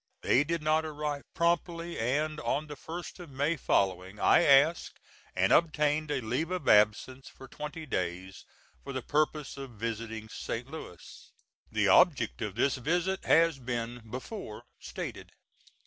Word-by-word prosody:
They 135 - +4
did 165 +1 -2
not 155 +1 +2
arrive 150 -2 -3
promptly, 170 0 0
and 150 +6 0
on 150 0 -1
the 150 -1 -8
1st 170 +6 -8
of 175 -3 -9
May 145 +4 0
following 95 - 0
I - - +5
asked 145 +4 +4 0.4
and - - +3
obtained 150 -2 +2
a 140 -3 -1
leave 125 +9 -2
of 185 -1 -4
absence 105 +5 +3
for 135 - -13
twenty 150 +4 -7
days, 90 - -4 0.4
for 140 - -6
the 130 -2 -4
purpose 150 -1 -1
of 135 -3 -8
visiting 115 0 -4
St. 115 +2 -5
Louis. 120 - -10 0.4
The - - +2
object 140 -11 +4
of 105 -4 -3
this 130 +4 +1
visit 175 +8 -1
has 165 -3 +4
been 120 -1 -4
before 130 - -7 0.2
stated. - - -7
145 Hz, 145 wpm, -30 LUFS, 115-160 Hz, 0.4 s, I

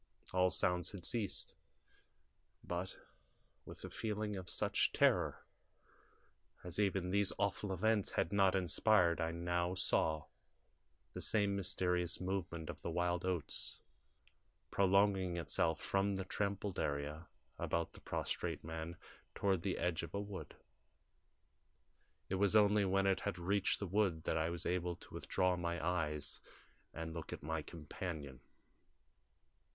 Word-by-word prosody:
All 90 0 +4
sounds 90 -1 +1
had 90 -3 -7
ceased, 115 -6 -2 1.1
but, 90 +2 -3 0.7
with - - -9
a - - -7
feeling 105 -1 -2
of 95 -2 -6
such - - +2
terror - - +3 1.2
as 90 +2 -4
even 95 -3 +1
these 100 0 +3
awful 100 0 0
events 105 +2 +2
had 80 - +1
not 95 -1 +5
inspired, 90 -1 +4
I 80 - +1
now 85 +1 0
saw 80 -4 +1 0.9
the - - -5
same 100 -2 +2
mysterious 90 -2 0
movement 90 -4 -2
of - - -6
the - - -3
wild 90 +1 0
oats 90 -6 -3 0.9
prolonging 95 -2 +3
itself 80 -1 +1
from 100 0 +1
the 95 -1 -3
trampled 100 0 -2
area 75 +3 -2 0.3
about 85 -1 -1
the - - -13
prostrate - - -2
man 80 +1 -5 0.4
toward 95 -3 +2
the 95 +1 -1
edge 85 -2 0
of 85 - -6
a - - 0
wood. 100 -2 -6 1.7
It 95 - -1
was 100 +1 +4
only 105 -1 +6
when 95 +1 +2
it 95 -1 +3
had 100 -2 -2
reached 100 +3 +1
the 100 - -3
wood 95 -4 +1
that - - 0
I 80 0 +1
was 85 0 -5
able 90 0 0
to - - -15
withdraw 90 -1 +1
my 85 -1 -2
eyes 75 -3 -1 0.5
and 80 0 -5
look 80 -1 -6
at - - -6
my 80 +1 -1
companion. 75 -4 -6
90 Hz, 135 wpm, -37 LUFS, 85-100 Hz, 1.7 s, only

